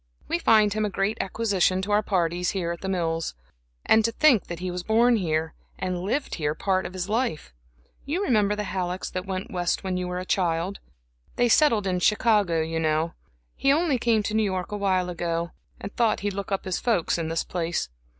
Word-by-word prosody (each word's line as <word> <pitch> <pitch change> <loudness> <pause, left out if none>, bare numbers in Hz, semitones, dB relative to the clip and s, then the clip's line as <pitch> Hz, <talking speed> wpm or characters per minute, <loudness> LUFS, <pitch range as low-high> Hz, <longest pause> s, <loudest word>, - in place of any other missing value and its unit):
We 340 - 0
find 215 - +4
him 215 0 -1
a 210 - 0
great 200 +3 -1
acquisition 195 -3 +1
to 205 - -3
our 205 +1 +4
parties 180 -3 0
here 175 -3 -2
at 170 - -6
The 190 - -3
Mills. 165 - -1 0.5
And 220 0 +5
to 230 - +1
think 255 -3 +4
that 170 - -5
he 180 +1 -4
was 180 0 -4
born 230 +4 +3
here, 160 -4 -1 0.2
and 180 -1 -3
lived 245 +10 -2
here 150 -2 -1
part 190 +2 0
of 180 - -11
his 185 -1 -3
life! 210 - -2 0.5
You 335 +8 -2
remember 210 - +2
the 210 - -3
Hallecks 185 -2 -3
that 185 +1 -4
went 190 -1 -4
West 175 0 -1
when 185 -1 -2
you 180 0 -2
were 180 0 -3
a 185 - -4
child? 180 +1 0 0.6
They 245 0 +2
settled 230 -6 +4
in 185 -1 0
Chicago, 205 -4 +3
you 160 +1 -2
know. 160 +1 0 0.4
He 275 - +2
only 300 -3 +2
came 225 -2 +2
to 210 - -3
New 220 - +3
York 190 -2 -2
awhile 190 -3 0
ago, 170 -1 -2 0.3
and 200 - -8
thought 230 -3 +2
he'd 205 0 -2
look 200 +1 -5
up 195 - -1
his 185 -1 -1
folks 215 -8 +1
in 165 - -2
this 165 0 -1
place. 175 -1 -2
190 Hz, 210 wpm, -25 LUFS, 175-215 Hz, 0.6 s, And